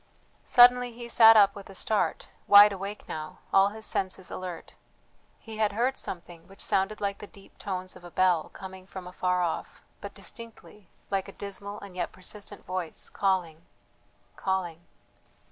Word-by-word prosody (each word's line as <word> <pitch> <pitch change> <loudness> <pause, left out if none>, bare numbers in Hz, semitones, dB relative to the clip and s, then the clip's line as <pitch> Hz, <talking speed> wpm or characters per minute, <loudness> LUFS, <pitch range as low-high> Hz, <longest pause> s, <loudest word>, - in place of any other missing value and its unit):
Suddenly 245 0 +6
he 235 0 -8
sat 225 -1 +7
up 200 -1 +6
with 200 -1 -11
a 195 - -11
start, 215 +3 0 0.2
wide 205 +1 +9
awake 200 +2 -7
now, 155 -1 -6 0.2
all 195 0 +6
his 220 +1 -7
senses 190 -1 -1
alert. 180 -3 -7 0.6
He 220 -1 -10
had 215 -2 +1
heard 250 +5 +1
something 170 -2 -7
which 195 - -17
sounded 195 +3 0
like 200 -1 -2
the 205 - -9
deep 200 -2 -18
tones 185 -2 -4
of - - -14
a 175 - -10
bell, 180 -3 +2
coming 190 -1 -10
from 190 -2 -9
afar 180 0 -1
off, 170 - -4 0.2
but - - -8
distinctly, 225 -4 -10 0.2
like 195 0 -1
a - - -8
dismal 200 +1 -7
and 200 -2 -11
yet 180 - -3
persistent 205 +2 -7
voice, 185 -3 -4
calling... 175 -5 -1 0.7
calling. 175 -3 -3
195 Hz, 160 wpm, -28 LUFS, 180-210 Hz, 0.7 s, wide